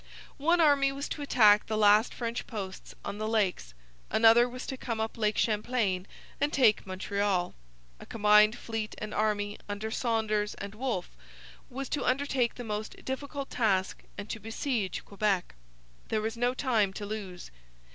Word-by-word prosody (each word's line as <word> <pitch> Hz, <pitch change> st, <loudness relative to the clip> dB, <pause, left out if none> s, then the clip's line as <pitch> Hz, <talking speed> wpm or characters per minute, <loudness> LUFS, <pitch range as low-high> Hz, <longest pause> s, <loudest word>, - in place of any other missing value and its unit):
One 335 Hz, +5 st, +3 dB
army 285 Hz, -4 st, +4 dB
was 275 Hz, +1 st, -4 dB
to 295 Hz, -, -5 dB
attack 215 Hz, -7 st, +5 dB
the 220 Hz, -, -1 dB
last 210 Hz, +2 st, +5 dB
French 235 Hz, 0 st, -4 dB
posts 195 Hz, -5 st, -7 dB
on 205 Hz, -, -5 dB
the 215 Hz, -, -2 dB
Lakes. 190 Hz, -, 0 dB, 0.3 s
Another 230 Hz, +2 st, +6 dB
was 250 Hz, +1 st, -7 dB
to 265 Hz, -, -4 dB
come 230 Hz, -3 st, -4 dB
up 220 Hz, 0 st, -2 dB
Lake 215 Hz, -2 st, 0 dB
Champlain 210 Hz, -4 st, 0 dB, 0.3 s
and 290 Hz, +1 st, +1 dB
take 230 Hz, -9 st, +3 dB
Montreal. 190 Hz, -1 st, -1 dB, 0.5 s
A -, -, -11 dB
combined 210 Hz, +1 st, +5 dB
fleet 225 Hz, -3 st, -4 dB
and 215 Hz, 0 st, -6 dB
army, 210 Hz, -1 st, -1 dB
under 210 Hz, +2 st, -4 dB
Saunders 220 Hz, -3 st, 0 dB
and 200 Hz, 0 st, -7 dB
Wolfe, 225 Hz, -5 st, -3 dB, 0.5 s
was 270 Hz, +1 st, -5 dB
to 285 Hz, -, -1 dB
undertake 255 Hz, -2 st, +1 dB
the 245 Hz, -, -6 dB
most 215 Hz, -1 st, -5 dB
difficult 280 Hz, +1 st, -5 dB
task 195 Hz, -6 st, 0 dB, 0.2 s
and 205 Hz, -, -6 dB
to 225 Hz, -, -4 dB
besiege 225 Hz, -1 st, -3 dB
Quebec. 200 Hz, -2 st, -1 dB, 0.5 s
There 215 Hz, -, 0 dB
was 220 Hz, +1 st, -3 dB
no 245 Hz, +2 st, 0 dB
time 225 Hz, -8 st, +1 dB
to 205 Hz, -, -6 dB
lose. 200 Hz, -4 st, -7 dB
220 Hz, 160 wpm, -29 LUFS, 205-245 Hz, 0.5 s, Another